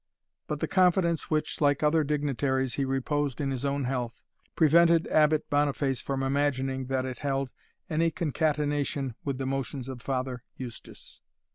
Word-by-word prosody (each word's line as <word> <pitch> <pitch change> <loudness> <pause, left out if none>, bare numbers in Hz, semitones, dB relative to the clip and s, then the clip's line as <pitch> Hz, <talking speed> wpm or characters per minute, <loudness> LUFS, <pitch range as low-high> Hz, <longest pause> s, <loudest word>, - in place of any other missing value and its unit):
But - - -3
the - - 0
confidence 180 -3 +2
which, 155 0 -1
like 145 0 +3
other 155 +1 +4
dignitaries, 140 -3 0
he 140 - 0
reposed 135 +1 -1
in 140 -2 -1
his 130 -1 -3
own 140 0 0
health, 125 -2 -3 0.3
prevented 170 +1 +5
Abbot 155 0 +3
Boniface 145 -2 +1
from 135 -1 -2
imagining 135 -1 0
that 130 -1 0
it 130 -3 -5
held 135 -2 -1 0.4
any 165 +1 +2
concatenation, 145 -4 -1
with 140 -2 -2
the 135 - -3
motions 135 -1 -3
of 130 -3 -7
Father 130 -2 -2 0.2
Eustace. 120 -4 -9
140 Hz, 150 wpm, -28 LUFS, 130-150 Hz, 0.4 s, prevented